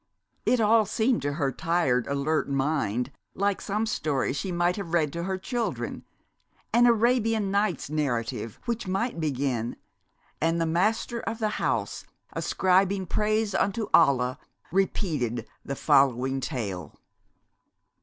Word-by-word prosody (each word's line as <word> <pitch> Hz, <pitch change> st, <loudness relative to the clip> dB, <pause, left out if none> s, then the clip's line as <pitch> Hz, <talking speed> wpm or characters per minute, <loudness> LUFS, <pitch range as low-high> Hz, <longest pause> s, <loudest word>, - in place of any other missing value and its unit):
It 250 Hz, -, +4 dB
all 220 Hz, -1 st, +4 dB
seemed 225 Hz, -, +1 dB
to 145 Hz, +1 st, -1 dB
her 140 Hz, -3 st, 0 dB
tired, 150 Hz, -7 st, +1 dB
alert 140 Hz, +3 st, 0 dB
mind 135 Hz, -4 st, 0 dB, 0.2 s
like 200 Hz, 0 st, 0 dB
some 210 Hz, +2 st, -1 dB
story 150 Hz, -12 st, -1 dB
she 145 Hz, +7 st, -3 dB
might 175 Hz, +1 st, +1 dB
have 175 Hz, -5 st, -3 dB
read 155 Hz, -4 st, +1 dB
to 170 Hz, 0 st, -3 dB
her 190 Hz, 0 st, -1 dB
children, 235 Hz, +5 st, -3 dB, 0.7 s
an 240 Hz, +1 st, +6 dB
Arabian 225 Hz, -3 st, +2 dB
Nights 200 Hz, -6 st, 0 dB
narrative 120 Hz, -7 st, -2 dB
which 235 Hz, -4 st, -2 dB
might 195 Hz, +1 st, -1 dB
begin, 135 Hz, -6 st, -1 dB, 0.7 s
"And 165 Hz, +2 st, +2 dB
the 165 Hz, -, +1 dB
Master 210 Hz, +8 st, 0 dB
of 225 Hz, 0 st, -4 dB
the 215 Hz, -2 st, -2 dB
House, -, -, -1 dB, 0.3 s
ascribing 190 Hz, +1 st, +2 dB
praise 215 Hz, +2 st, 0 dB
unto 210 Hz, +2 st, 0 dB
Allah, 130 Hz, -4 st, +4 dB, 0.3 s
repeated 150 Hz, -, 0 dB, 0.2 s
the 140 Hz, -, -4 dB
following 135 Hz, 0 st, +3 dB
Tale." 110 Hz, -, -4 dB
170 Hz, 130 wpm, -27 LUFS, 135-210 Hz, 0.7 s, an